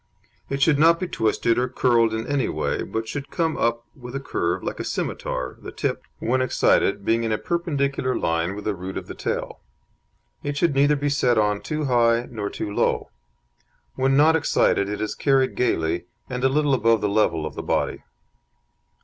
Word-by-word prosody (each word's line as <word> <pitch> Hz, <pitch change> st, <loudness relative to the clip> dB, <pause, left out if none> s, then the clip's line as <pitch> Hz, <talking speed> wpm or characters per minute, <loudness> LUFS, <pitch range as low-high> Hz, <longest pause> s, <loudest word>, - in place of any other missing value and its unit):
It 140 Hz, 0 st, 0 dB
should 150 Hz, -4 st, +4 dB
not 165 Hz, +2 st, +5 dB
be 185 Hz, -, -2 dB
twisted 115 Hz, -3 st, +1 dB
or 125 Hz, -, +1 dB
curled 115 Hz, -3 st, +3 dB
in 110 Hz, 0 st, -3 dB
any 140 Hz, -3 st, 0 dB
way, -, -, -1 dB
but 110 Hz, 0 st, -4 dB
should 145 Hz, +3 st, -5 dB
come 165 Hz, -2 st, 0 dB
up 115 Hz, 0 st, 0 dB
with 125 Hz, -2 st, -9 dB
a -, -, -1 dB
curve 85 Hz, -10 st, -2 dB
like -, -, -4 dB
a -, -, -2 dB
scimitar, 65 Hz, 0 st, -3 dB
the -, -, -8 dB
tip, -, -, -2 dB, 0.2 s
when 130 Hz, +3 st, 0 dB
excited, 105 Hz, -5 st, +2 dB
being 115 Hz, +1 st, +2 dB
in 115 Hz, -, -1 dB
a 110 Hz, -, +1 dB
perpendicular 140 Hz, -6 st, -1 dB
line 85 Hz, +3 st, -1 dB
with 105 Hz, -, -8 dB
the 105 Hz, -, 0 dB
root 95 Hz, 0 st, -6 dB
of -, -, -5 dB
the -, -, -8 dB
tail. -, -, -4 dB, 0.8 s
It 145 Hz, 0 st, -3 dB
should 165 Hz, 0 st, +2 dB
neither 145 Hz, +2 st, +4 dB
be 145 Hz, 0 st, -1 dB
set 125 Hz, -4 st, +2 dB
on 105 Hz, -1 st, +2 dB
too 155 Hz, -1 st, -3 dB
high 120 Hz, -2 st, +3 dB
nor 105 Hz, -4 st, -3 dB
too 100 Hz, -, -5 dB
low. -, -, 0 dB, 0.8 s
When 135 Hz, +1 st, +2 dB
not 155 Hz, +2 st, +5 dB
excited 100 Hz, -9 st, +2 dB
it 105 Hz, -, -4 dB
is 110 Hz, -, -2 dB
carried 135 Hz, -2 st, +2 dB
gaily, 85 Hz, -8 st, 0 dB, 0.2 s
and 125 Hz, 0 st, -4 dB
a 135 Hz, -, +5 dB
little 145 Hz, 0 st, +2 dB
above 115 Hz, -3 st, +3 dB
the 105 Hz, -, +1 dB
level 100 Hz, -7 st, +1 dB
of 75 Hz, -, -5 dB
the -, -, -5 dB
body. -, -, -1 dB
125 Hz, 195 wpm, -23 LUFS, 105-140 Hz, 0.8 s, not